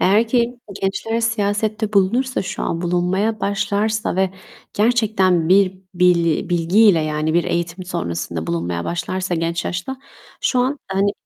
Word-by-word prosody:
Eğer 210 +5 +3
ki 240 0 +1 0.2
gençler 225 +4 -1
siyasette 215 -1 -1
bulunursa 235 +7 +2
şu - - -5
an, 165 - -2
bulunmaya 185 +5 0
başlarsa 205 +1 -1
ve 190 -1 +2 0.4
gerçekten 205 -7 +2
bir 190 0 +4 0.2
bili 175 -3 +2
bilgiyle, 175 +2 +4
yani, 155 +1 -1
bir 175 - +3
eğitim 170 +2 -2
sonrasında 85 - -4
bulunmaya 85 0 -2
başlarsa 180 +1 -2
genç 165 +1 -2
yaşta, 190 +10 -4 0.4
şu 255 - +1
an, 260 +3 +1
hani, 195 +1 +1
190 Hz, 135 wpm, -20 LUFS, 170-215 Hz, 0.4 s, bir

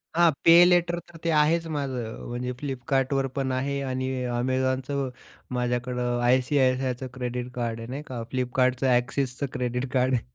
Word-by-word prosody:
हां 170 -1 +5
पे-लेटर 175 0 +6
तर 165 - -12
ते 170 - 0
आहेच 160 +2 +3
माझं. 130 -7 -4
म्हणजे 125 +1 -3
फ्लिपकार्टवर 135 0 0
पण 135 -1 0
आहे 140 +2 -1
आणि 130 -1 -2 0.3
Amazonचं 130 +1 0 0.4
माझ्याकडं 125 0 -1
आय-सी-आय-सी-आयचं 130 0 +2
क्रेडिट 125 -1 -4
कार्ड 115 -2 -2
आहे 115 - -7
नाही 140 +4 -5
का. 125 -3 -5
फ्लिपकार्टचं, 130 0 +1
एक्सिसचं 125 +2 0
क्रेडिट 125 +1 -2
कार्ड 130 0 +2
आहे. 120 - +2
130 Hz, 140 wpm, -26 LUFS, 125-140 Hz, 0.4 s, पे-लेटर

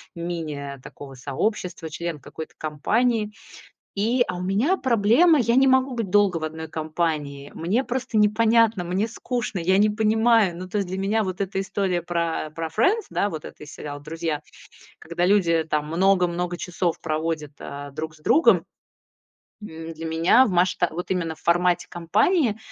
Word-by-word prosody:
мини 155 -5 -5
такого 135 -2 -11
сообщества, 160 - -3
член 165 0 -5
какой-то 160 +4 -9
компании. 215 - 0 0.6
И, 235 +5 +2
а 180 - -2
у - - -5
меня 210 - +1
проблема: 255 - +4
я 235 -1 +2
не 270 +1 +5
могу 260 0 +3
быть 225 -5 -3
долго 205 -4 +3
в 160 - -3
одной 160 0 -6
компании, 155 -3 -3
мне 200 +11 0
просто 245 -2 -3
непонятно, 220 -2 +3
мне 185 +5 0
скучно, 230 -3 -4
я 185 +3 +2
не 210 +2 +4
понимаю. 220 -2 +3
Ну, 185 +1 -7
то 210 - -2
есть 200 -3 -1
для 190 +1 -4
меня 210 +3 +1
вот 185 0 -4
эта 195 0 -2
история 195 -2 -1
пра 170 -2 -2
про 165 0 -3
Friends, 370 - +1
да, 200 - 0
вот 160 -5 -6
это - - -11
из 150 - -11
сериала 145 -1 -7
"Друзья", 160 0 -4 0.6
когда 170 +2 -2
люди 170 -5 +3
там 150 0 0
много-много 180 0 +1
часов 175 -1 -2
проводят, 155 -1 -2
э, 140 0 -7
друг 155 +2 -6
с 155 - -21
другом, 320 - +4 1.0
м, 165 -4 -8
для 165 +1 -8
меня 165 +11 +4
в - - -1
масшта 180 -1 +2
вот 175 +3 -5
именно 165 -3 -1
в - - -23
формате 175 0 +2
компании, 215 - +1
180 Hz, 170 wpm, -24 LUFS, 160-215 Hz, 1.0 s, не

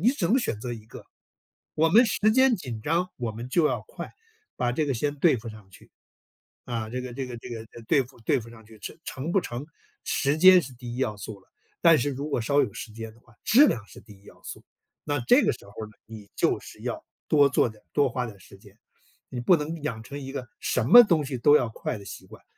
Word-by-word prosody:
你 210 - +4
只 260 -9 -3
能 245 - +4
选 115 - -3
择 120 +1 -4
一 110 -2 -8
个。 - - -12 0.7
我 160 +1 +3
们 225 +8 +6
时 210 +1 +2
间 260 +2 +4
紧 125 - -6
张， 170 +7 0
我 120 -3 -3
们 115 +3 -7
就 160 +4 +3
要 - - -1
快， - - -8 0.4
把 125 - 0
这 150 +5 -1
个 140 - 0
先 145 +5 -2
对 150 -1 +4
付 115 0 -8
上 110 -3 -12
去。 - - -17 0.8
啊， 115 -3 -4
这 125 +3 -4
个 125 -1 -7
这 130 +1 -4
个 120 -1 -7
这 115 - -11
个 115 -2 -6 0.2
对 145 - +4
付 125 0 -18
对 110 - +1
付 115 0 -11
上 110 -1 -15
去， 110 0 -17
成 - - -8
成 145 +6 -4
不 195 - +3
成， 120 -6 -6 0.4
时 140 +1 0
间 185 +3 +8
是 130 - -9
第 120 -1 -8
一 - - -7
要 120 -5 -1
素 100 0 -8
了。 95 - -28 0.3
但 165 -3 +6
是 145 - 0
如 140 +2 -4
果 135 - -1
稍 140 +6 +2
有 - - +1
时 110 - -8
间 110 0 -8
的 115 - -22
话， 120 -1 -24
质 265 +8 +6
量 110 - -2
是 - - -14
第 105 -2 -16
一 - - -26
要 - - -17
素。 - - -9 0.4
那 145 0 -1
这 260 +4 +6
个 - - +2
时 - - -13
候 100 - -15
儿 - - -5
呢， 105 - -14 0.2
你 110 -2 -11
就 - - +1
是 - - -13
要 - - -4 0.2
多 145 -2 +5
做 125 - +2
点、 110 -1 -16
多 145 -2 +3
花 125 +1 -2
点 110 -4 -9
儿 - - -21
时 - - -16
间， - - -19 0.5
你 125 - -5
不 175 +9 +5
能 155 +1 -5
养 115 -7 -4
成 140 +5 -8
一 135 -1 -7
个 130 -3 -6
什 125 - 0
么 240 - +10
东 170 -8 +1
西 130 -2 -4
都 145 +5 +6
要 125 -6 +2
快 110 +2 -5
的 100 - -12
习 - - -10
惯。 - - -15
125 Hz, 280 characters per minute, -26 LUFS, 115-155 Hz, 0.8 s, 么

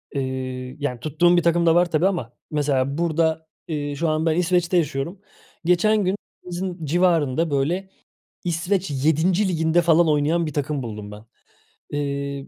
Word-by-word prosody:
Eee, 130 -1 -4
yani, 125 -4 -3
tuttuğum 175 +5 +3
bir 175 - +3
takım 170 0 +2
da 165 0 +5
var 175 -1 +3
tabii 165 +4 +3
ama, 160 - -3 0.2
mesela, 140 -1 0
burada, 160 -1 0 0.2
eee, 145 -3 -3
şu 160 +2 0
an 155 +1 0
ben 160 -1 +2
İsveç'te 180 0 +2
yaşıyorum. 165 +4 -1 0.5
Geçen 205 +4 +3
gün 185 +2 +1 0.3
evimizin 180 -2 -5
civarında, 165 -2 +2
böyle, 170 +8 0 0.5
İsveç 175 +1 -1
7'nci 160 +8 +2
Ligi'nde, 165 0 +2
falan, 170 0 +4
oynayan 155 +3 +2
bir 155 - -5
takım 145 -2 -2
buldum 105 -2 -7
ben. 105 +2 -11 0.7
Eee, 140 -1 -3
160 Hz, 155 wpm, -23 LUFS, 140-175 Hz, 0.7 s, da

